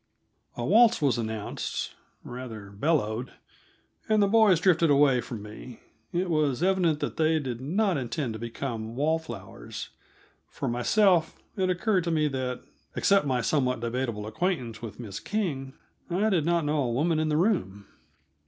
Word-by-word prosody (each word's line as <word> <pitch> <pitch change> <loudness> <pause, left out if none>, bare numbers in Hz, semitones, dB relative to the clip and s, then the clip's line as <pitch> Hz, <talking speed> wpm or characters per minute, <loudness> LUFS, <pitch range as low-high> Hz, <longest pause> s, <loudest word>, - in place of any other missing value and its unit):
A 120 - -2
waltz 230 - +5
was 135 -5 +2
announced 110 -2 -4 0.3
rather, 115 -5 -8
bellowed 120 0 -1 0.8
and 215 0 +4
the 200 - +4
boys 210 -5 +5
drifted 170 -2 +3
away 140 -3 +4
from 115 -3 -7
me. 110 +3 -10 0.3
It 180 +2 0
was 155 -3 +1
evident 180 -5 +2
that - - -3
they 160 0 +3
did 130 -5 -4
not 185 +5 +1
intend 130 -1 -3
to 110 - -7
become 115 -1 -5
wall 155 +4 +1
flowers. 160 - -8 0.6
For - - -4
myself, 165 - +3 0.2
it 185 -2 0
occurred 185 +1 +1
to - - 0
me 155 -2 +2
that, 130 -2 -3 0.3
except 195 -6 +3
my 125 -2 +1
somewhat 125 0 +1
debatable 115 -3 -2
acquaintance 125 - -2
with 115 -2 -8
Miss 105 -4 -6
King, 150 -11 -3 0.4
I 200 +5 +1
did 165 -5 +1
not 170 -2 +2
know 150 0 +1
a 125 -3 0
woman 155 +6 +1
in 155 0 0
the 150 - +1
room. 105 - 0
145 Hz, 160 wpm, -27 LUFS, 120-175 Hz, 0.8 s, waltz